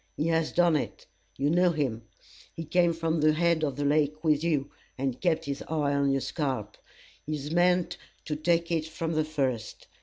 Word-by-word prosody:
He 150 - 0
has 165 -1 +1
done 175 -2 +3
it. 145 - -3 0.3
You 140 +2 +1
know 180 +1 +4
him. 140 -9 -1 0.5
He 165 - -5
came 175 +2 +3
from 165 -1 -1
the 155 0 +5
head 170 0 +2
of 140 -4 0
the 145 +1 -2
lake 150 +1 +1
with 155 -1 +2
you, 145 -4 0 0.3
and 130 -1 -2
kept 170 -4 +1
his 140 -1 -4
eye 150 -3 0
on 140 0 +2
your 135 0 +1
scalp. 130 -6 -3 0.5
He 155 - -3
has 145 +1 -6
meant 180 +1 +2 0.3
to 150 - -2
take 170 +2 +1
it 160 -2 0
from 160 +1 -4
the 155 -1 +1
first. 135 -7 -3
155 Hz, 195 wpm, -28 LUFS, 140-165 Hz, 0.5 s, the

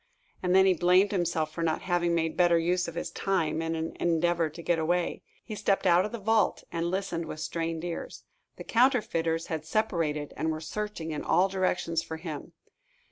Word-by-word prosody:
And 180 0 +2
then 190 0 +7
he 190 - +5
blamed 180 +3 +4
himself 165 -5 -1
for 170 - -4
not 160 -1 0
having 175 -2 +1
made 165 -1 0
better 175 -1 +4
use 175 +2 +1
of 170 - -7
his 170 - -4
time 165 -5 0
in 165 0 -2
an 160 0 -4
endeavor 170 -1 +1
to 160 +3 -10
get 170 -1 +1
away. 175 +2 0 0.2
He 220 - -7
stepped 200 -1 0
out 175 +3 +5
of 210 - -5
the 235 - -4
vault, 220 +1 +1
and 170 0 -1
listened 185 -3 -2
with 155 - -6
strained 165 0 -3
ears. 175 -1 -5 0.3
The - - -8
counterfeiters 180 -10 +2
had 160 -2 -4
separated, 160 -6 -1
and 160 - -1
were 155 0 -2
searching 165 0 -4
in 150 - -3
all 190 +2 +3
directions 180 -3 0
for 160 -1 -6
him. 160 -3 -7
170 Hz, 195 wpm, -28 LUFS, 165-185 Hz, 0.3 s, then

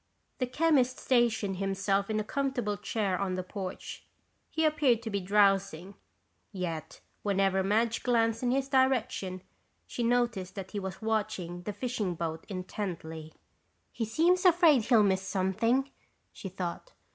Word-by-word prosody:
The 255 - 0
chemist 260 -2 +2
stationed 230 -6 +1
himself 195 +1 0
in 215 0 0
a - - -1
comfortable 250 -4 -1
chair 205 -2 -2
on 190 -2 -1
the 185 - -3
porch. 190 0 -7 0.4
He 320 0 0
appeared 280 -7 +2
to 225 - -4
be 200 - 0
drowsing, 195 -2 +2 0.6
yet 165 -5 -5 0.2
whenever 195 -1 +2
Madge 225 +4 +1
glanced 230 -2 +1
in 250 - 0
his 270 +1 +1
direction 260 -9 +1 0.4
she - - -5
noticed 235 -6 0
that 190 -2 -7
he 205 - -3
was 190 +2 -6
watching 205 -6 -2
the 210 - -4
fishing 210 -4 -2
boat 160 -1 -4
intently. 175 -5 -5 0.6
"He 225 - -3
seems 340 +11 +2
afraid 335 - +5
he'll 230 -4 +5
miss 190 -2 +2
something," 210 +8 0 0.4
she 195 - -7
thought. 185 - -5
210 Hz, 145 wpm, -30 LUFS, 190-245 Hz, 0.6 s, afraid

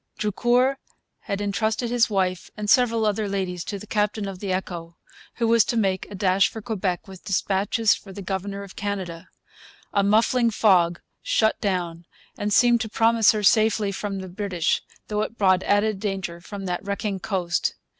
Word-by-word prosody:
Drucour 245 +6 +2 0.4
had 200 0 -4
entrusted 220 +3 -1
his 240 -1 +3
wife 185 -3 -1
and 210 0 -4
several 230 -3 +3
other 210 0 0
ladies 185 -3 -2
to 205 - -4
the 200 - -10
captain 210 -1 -1
of 190 -2 -7
the 195 -1 -3
Echo, 170 -3 -4 0.4
who 230 - 0
was 230 -1 +5
to 235 - -1
make 190 -4 0
a 205 - -8
dash 190 0 +3
for 225 - -8
Quebec 200 -6 -3
with 190 -1 -12
dispatches 200 +3 +1
for 195 - -9
the 195 +1 -8
governor 195 +1 -4
of 195 - -12
Canada. 190 -5 -5 0.6
A 200 - +3
muffling 230 +4 +3
fog 180 -6 +3 0.2
shut 220 -1 +1
down 175 -4 -2 0.3
and 205 0 -3
seemed 240 +2 +4
to 220 - -3
promise 225 0 +4
her 210 -1 -2
safety 215 0 +3
from 195 0 -4
the 190 - -7
British, 180 -3 -1 0.3
though 210 0 -1
it 230 +2 -4
brought 185 -2 +3
added 205 +1 +1
danger 195 -4 -4
from 195 +2 -7
that 180 0 -3
wrecking 200 0 -3
coast. 180 -4 -1
200 Hz, 175 wpm, -24 LUFS, 190-220 Hz, 0.6 s, was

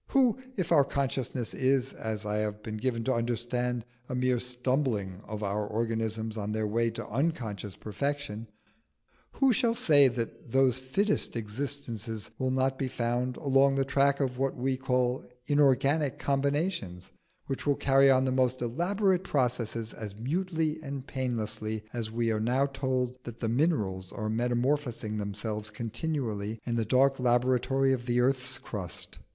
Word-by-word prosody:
Who 260 -3 +3 0.2
if 180 -4 -2
our 150 -4 +7
consciousness 130 -3 -2
is, 130 0 +1
as 110 -1 -4
I 105 0 -1
have 105 0 -2
been 110 0 -4
given 115 0 -1
to 130 - +1
understand, 120 0 -1 0.2
a 125 - -2
mere 125 -1 +2
stumbling 125 -6 -1
of 105 0 -5
our 100 +1 0
organisms 110 0 -2
on 105 0 -2
their 110 0 0
way 115 +2 +1
to 115 - -6
unconscious 115 - -2
perfection 140 -1 -3 0.9
who 270 -2 +4
shall 230 0 +2
say 145 -9 +6
that 115 -1 -4
those 130 -1 +4
fittest 195 +11 0
existences 115 -2 -4
will 130 - +1
not 130 +1 +1
be 135 - 0
found 125 0 -1
along 135 -1 +4
the 135 0 +2
track 140 +1 +3
of 130 -3 -1
what 135 0 0
we 130 +1 0
call 125 -1 0 0.2
inorganic 140 0 +3
combinations, 140 - -1 0.3
which 135 +1 -4
will 145 - +4
carry 135 0 +5
on 130 0 +5
the 130 - +1
most 130 -1 +1
elaborate 185 - +1
processes 120 - -1
as 105 -3 -7
mutely 160 - -1
and 140 -3 -5
painlessly 110 -4 -3
as 115 -3 -3
we 115 0 0
are 110 - 0
now 125 +5 +2
told 130 -2 -1
that 120 -1 -8
the 115 - -1
minerals 110 - 0
are 110 -2 -3
metamorphosing 120 -1 0
themselves 105 +1 -3
continually 115 -2 -3
in 120 - -2
the 115 -1 +1
dark 135 +4 +3
laboratory 130 +2 +3
of 120 -1 -3
the 120 0 +2
earth's 130 0 +1
crust? 100 -9 -5
125 Hz, 155 wpm, -29 LUFS, 110-135 Hz, 0.9 s, our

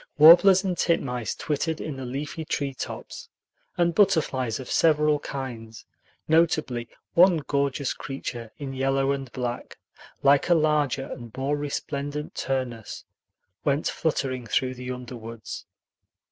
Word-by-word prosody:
Warblers 180 +5 +8
and 185 -2 -1
titmice 125 -10 0
twittered 160 +1 -2
in 150 - -4
the 130 -1 -6
leafy 145 +5 -4
treetops, 140 -3 -5 0.5
and 170 -1 +2
butterflies 135 - +2
of 130 - -7
several 150 -2 +3
kinds, 115 -7 -7 0.4
notably 155 -7 +2 0.2
one 180 0 +6
gorgeous 140 -1 0
creature 120 -4 -6
in 135 -2 -5
yellow 135 +1 +1
and 135 -3 -4
black, 120 -1 -4 0.5
like 140 +3 +4
a 175 - +6
larger 150 -4 +2
and 120 -3 -9
more 135 +2 0
resplendent 145 0 -4
Turnus, 125 -4 -3 0.6
went 145 +1 +1
fluttering 130 -6 -2
through 130 +4 0
the 125 0 -7
underwoods. 120 -3 -7
140 Hz, 120 wpm, -26 LUFS, 125-150 Hz, 0.6 s, Warblers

